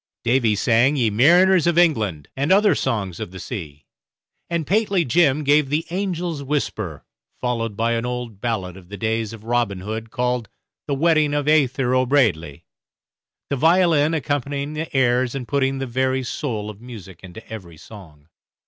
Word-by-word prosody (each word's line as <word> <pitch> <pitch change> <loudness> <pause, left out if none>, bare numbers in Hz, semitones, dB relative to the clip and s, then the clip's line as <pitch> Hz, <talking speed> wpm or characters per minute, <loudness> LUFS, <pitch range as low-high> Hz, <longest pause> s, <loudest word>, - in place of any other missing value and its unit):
Davy 120 -3 +2
sang 120 +6 +3
"Ye 120 -6 +1
Mariners 175 - +5
of 170 -1 +2
England," 110 - +2
and 140 +5 -1
other 205 +1 +5
songs 100 -9 -2
of - - -5
the 95 - -11
sea; 80 - -7 0.6
and 170 -2 -1
Pateley 200 -2 +1
Jim 150 +1 +2
gave 145 0 +3
the 150 +3 0
"Angel's 175 -4 -2
Whisper," 110 - -3 0.3
followed 115 -4 -2
by 115 +1 +1
an 115 0 -1
old 125 -4 -5
ballad 95 -6 -3
of 90 -2 -15
the 100 - -7
days 110 +1 -1
of 110 -2 -11
Robin 115 -5 -1
Hood 110 +3 -5
called 125 -1 -2 0.4
"The 140 - 0
Wedding 155 -1 +2
of 145 -1 0
Aythur 135 -4 +2
O'Braidley," 110 - +1 0.9
the - - +2
violin 160 0 +3
accompanying 145 -1 -2
the 155 +1 -5
airs 125 0 +2
and 130 -3 -5
putting 135 -1 0
the 135 - -3
very 130 +1 -1
soul 105 -3 -4
of 105 +1 -16
music 100 -8 -11
into 95 +4 -11
every 90 -7 -9
song. 80 -7 -14
125 Hz, 165 wpm, -21 LUFS, 110-150 Hz, 0.9 s, Mariners